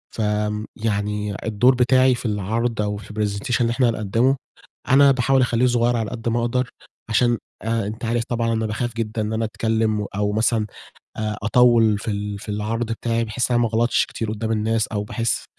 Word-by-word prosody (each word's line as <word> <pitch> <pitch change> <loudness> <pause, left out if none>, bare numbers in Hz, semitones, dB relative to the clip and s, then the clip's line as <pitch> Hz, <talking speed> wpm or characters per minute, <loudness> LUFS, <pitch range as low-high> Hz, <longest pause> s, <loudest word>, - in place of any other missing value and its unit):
ف - - -2
آمم 105 0 -1
يعني 105 -1 -2
الدور 115 +4 +3
بتاعي 130 +1 +4
في 120 - -8
العرض 110 +2 -1
أو 105 0 -2
في 105 - -11
الpresentation 105 +4 -1
اللي 115 -1 +2
إحنا 120 0 +2
هنقدّمه، 115 +4 +1 0.5
أنا 140 +1 +7
باحاول 135 +1 +2
أخلّيه 125 -1 +2
صغيّر 120 0 +2
على 110 -3 -2
قد 115 0 -3
ما 115 +1 +1
أقدر، 125 +2 0 0.4
عشان 120 +1 +3 0.3
آآ 115 -2 -1
أنت 110 +3 -5
عارف 115 0 0
طبعًا 115 -1 0
أنا 110 0 0
باخاف 110 +2 -2
جدًا 110 -1 -2
إن 105 +1 -2
أنا 110 +1 0
أتكلم، 110 -1 0
أو 105 0 0
مثلًا 110 0 +1 0.5
آآ 105 -1 -2
أطوّل 115 -2 +4
في 110 - -3
ال 105 0 -4
في 110 - -10
العرض 105 +3 -2
بتاعي، 115 0 -1
بحيث 120 +3 -2
إن - - +3
أنا 120 - +3
ما 115 - +1
أغلطش 115 +2 +2
كتير 110 -2 -4
قدّام 110 +1 -3
الناس، 110 0 +1
أو 105 -2 -3
باحس 115 +2 -2
115 Hz, 195 wpm, -22 LUFS, 105-120 Hz, 0.5 s, أنا